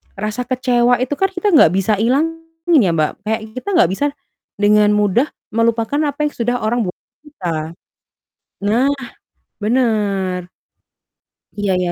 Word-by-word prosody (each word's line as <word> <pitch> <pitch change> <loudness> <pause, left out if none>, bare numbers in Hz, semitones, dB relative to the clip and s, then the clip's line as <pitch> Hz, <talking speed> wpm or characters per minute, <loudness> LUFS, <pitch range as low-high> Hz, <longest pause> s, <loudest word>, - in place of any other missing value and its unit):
rasa 215 +5 -3
kecewa 245 -1 +2
itu 280 +3 -3
kan 385 - +3
kita 380 +3 0
nggak 295 - +6
bisa 195 +2 +1
hilangin 325 +6 +1
ya 185 -8 +2
Mbak, 155 +3 -1
kayak 220 +1 0 0.2
kita 255 - -7
nggak 180 - +4
bisa, 240 +10 -1 0.5
dengan 210 +1 +4
mudah 210 +5 +2 0.2
melupakan 230 +4 0 0.2
apa 300 0 -1
yang - - -20
sudah 245 +1 -1
orang 225 +1 0
bu 180 - -4 0.3
kita. 165 - -4 0.9
Nah, 235 +6 +2 0.7
bener. 205 -6 0 1.1
Iya 205 -1 0
iya 180 -1 -1
225 Hz, 135 wpm, -18 LUFS, 200-260 Hz, 1.1 s, nggak